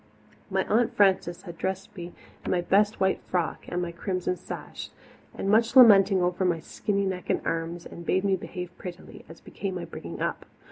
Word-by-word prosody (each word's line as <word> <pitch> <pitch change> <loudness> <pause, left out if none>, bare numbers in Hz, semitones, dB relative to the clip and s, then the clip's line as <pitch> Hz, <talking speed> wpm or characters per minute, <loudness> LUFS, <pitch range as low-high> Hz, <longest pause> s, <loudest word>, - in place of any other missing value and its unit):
My 190 -1 0
Aunt 230 +2 +1
Frances 190 -3 +2
had 170 -3 -10
dressed 190 +1 -3
me 175 -2 -7 0.3
in - - -4
my 180 - +2
best 205 +4 +2
white 190 0 +1
frock 175 -3 -1
and 180 0 -2
my 170 - -4
crimson 180 +1 -2
sash, - - -8 0.5
with - - -4
much 225 +4 +3
lamenting 195 -6 +8
over 180 +1 0
my 175 -3 +1
skinny 200 +5 -2
neck 185 -1 -4
and - - +2
arms, 165 +1 -3
and 170 - -9
bade 185 +3 +1
me 195 -1 +2
behave 180 -1 -7
prettily, 180 -1 -9
as 165 - -12
became 195 -2 -5
my 175 - -4
bringing - - -8
up. - - -3
185 Hz, 190 wpm, -27 LUFS, 175-195 Hz, 0.5 s, lamenting